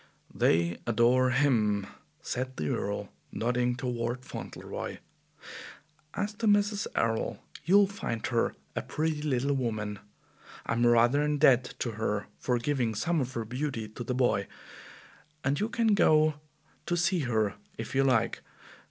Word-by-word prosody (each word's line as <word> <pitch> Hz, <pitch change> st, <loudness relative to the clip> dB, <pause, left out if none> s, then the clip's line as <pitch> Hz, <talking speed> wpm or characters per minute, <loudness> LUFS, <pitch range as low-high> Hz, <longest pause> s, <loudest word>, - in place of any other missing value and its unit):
"They 85 Hz, +1 st, +2 dB
adore 120 Hz, +3 st, +4 dB
HIM," 115 Hz, -7 st, +2 dB, 0.4 s
said 130 Hz, +1 st, -3 dB
the 75 Hz, -1 st, -2 dB
Earl, -, -, -2 dB, 0.2 s
nodding 125 Hz, +1 st, 0 dB
toward 120 Hz, 0 st, -3 dB
Fauntleroy. -, -, -6 dB, 1.2 s
"As 205 Hz, +1 st, -2 dB
to 220 Hz, +2 st, -2 dB
Mrs. 205 Hz, 0 st, +2 dB
Errol, 115 Hz, -1 st, -1 dB, 0.2 s
you'll 200 Hz, +4 st, +6 dB
find 190 Hz, -, -4 dB
her 115 Hz, -1 st, 0 dB, 0.2 s
a -, -, -1 dB
pretty 155 Hz, -1 st, -2 dB
little 140 Hz, -1 st, 0 dB
woman. 110 Hz, -5 st, -2 dB, 0.7 s
I'm 120 Hz, +1 st, +2 dB
rather 120 Hz, +4 st, +4 dB
in 150 Hz, 0 st, +1 dB
debt 130 Hz, -4 st, +4 dB
to 120 Hz, -, -2 dB
her 105 Hz, -2 st, -2 dB
for 125 Hz, -1 st, 0 dB
giving 120 Hz, -3 st, 0 dB
some 165 Hz, +8 st, 0 dB
of 130 Hz, 0 st, -3 dB
her 115 Hz, -1 st, -3 dB
beauty 125 Hz, -1 st, -3 dB
to 115 Hz, +3 st, -7 dB
the 125 Hz, +1 st, -2 dB
boy, 110 Hz, -6 st, +1 dB, 1.0 s
and 140 Hz, +2 st, +1 dB
you 215 Hz, -, 0 dB
can 230 Hz, -2 st, +2 dB
go 155 Hz, -6 st, +4 dB, 0.5 s
to 175 Hz, -, +1 dB
see 175 Hz, +1 st, +2 dB
her 110 Hz, -7 st, 0 dB, 0.2 s
if -, -, -6 dB
you 135 Hz, -, +3 dB
like. 120 Hz, -4 st, +2 dB
125 Hz, 145 wpm, -29 LUFS, 115-150 Hz, 1.2 s, you'll